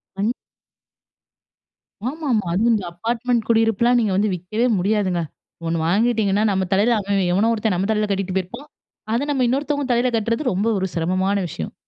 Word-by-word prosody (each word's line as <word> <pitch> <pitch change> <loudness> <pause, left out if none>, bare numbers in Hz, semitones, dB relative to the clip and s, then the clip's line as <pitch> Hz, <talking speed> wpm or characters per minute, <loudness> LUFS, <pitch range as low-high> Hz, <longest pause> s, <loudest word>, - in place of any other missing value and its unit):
ம். 210 +5 0 1.8
ஆமாமா. 275 - -1
அதுவும், 225 +6 +2
இந்த 200 -4 -1
அப்பார்ட்மெண்ட் 230 +4 -1
குடியிருப்புலாம், 225 +2 +3
நீங்க 215 -4 +1
வந்து 205 0 +1
விக்கவே 215 +8 -1
முடியாதுங்க. 190 -2 0 0.5
1 165 - 0
வாங்கிட்டீங்கன்னா, 210 0 +2
நம்ம 190 -1 0
தலையில 220 +5 +3
அவன், 200 -1 0
எவனோ 215 +5 +3
ஒருத்தன் 220 -3 0
நம்ம 195 +4 -1
தலையில 210 -1 0
கட்டிட்டு 190 -1 -2
போயிருப்பான். 235 +11 -5 0.4
அத 240 +5 +1
நம்ம 260 -3 +1
இன்னொருத்தவங்க 285 +2 -1
தலையில 245 +1 +1
கட்டுறது, 230 +5 -1
ரொம்ப 200 +5 0
ஒரு 190 - -1
சிரமமான 185 +4 0
விஷயம். 80 - -6
215 Hz, 150 wpm, -21 LUFS, 190-235 Hz, 1.8 s, குடியிருப்புலாம்